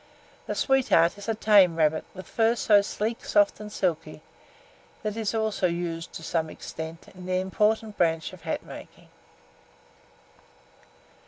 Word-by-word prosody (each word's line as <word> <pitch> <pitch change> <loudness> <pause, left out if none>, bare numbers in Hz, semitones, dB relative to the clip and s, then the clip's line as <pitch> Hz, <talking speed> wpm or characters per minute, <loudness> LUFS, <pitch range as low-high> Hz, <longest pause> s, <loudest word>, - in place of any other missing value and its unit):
The - - -2
sweetheart 250 - +3
is 205 - -7
a 225 - +1
tame 200 -6 +5
rabbit, 155 -1 +2
with 185 - -8
its - - -20
fur 225 +1 +3
so 210 -3 +4
sleek, 215 +3 -3
soft, 205 0 +2
and 210 0 -8
silky, 160 -5 -2 0.8
that 215 -1 -2
it 225 - -3
is 220 +1 -1
also 220 -4 0
used 170 -1 -4
to 165 - -8
some 160 -1 -1
extent 160 +1 -8
in 180 -1 -11
the 185 - 0
important 210 +3 0
branch 165 -2 0
of - - -12
hat - - -3
making. - - -12
190 Hz, 155 wpm, -26 LUFS, 165-215 Hz, 0.8 s, tame